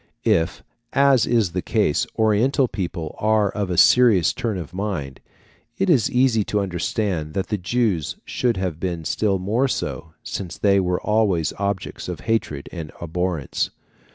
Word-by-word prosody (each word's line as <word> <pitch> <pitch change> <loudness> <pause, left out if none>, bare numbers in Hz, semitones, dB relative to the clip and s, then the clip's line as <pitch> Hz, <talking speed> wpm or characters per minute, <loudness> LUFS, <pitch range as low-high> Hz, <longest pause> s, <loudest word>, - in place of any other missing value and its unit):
If, 80 +1 +1 0.3
as 140 -3 +4
is 115 -7 +2
the 90 +1 -2
case, - - +1
Oriental 115 +5 +3
people 85 -7 -4
are 105 -2 +2
of 100 -2 -3
a 90 - -2
serious 110 -9 +5
turn 110 -5 -2
of 90 -1 -7
mind, 90 -9 -4 0.6
it 190 -1 +2
is 130 -10 +3
easy 125 -4 +3
to 105 - 0
understand 90 -3 -2
that 95 - -2
the 105 - 0
Jews 95 - 0
should 120 -4 0
have 90 -4 -3
been 85 -3 -3
still 100 +2 +1
more 110 +9 +1
so, 85 -9 -4
since 90 -4 -5
they 100 -1 +3
were 90 -1 0
always 105 -7 +1
objects 100 -1 -3
of - - -5
hatred 95 -11 -1
and 80 -4 -7
abhorrence. 85 -3 -2
100 Hz, 155 wpm, -22 LUFS, 85-110 Hz, 0.6 s, serious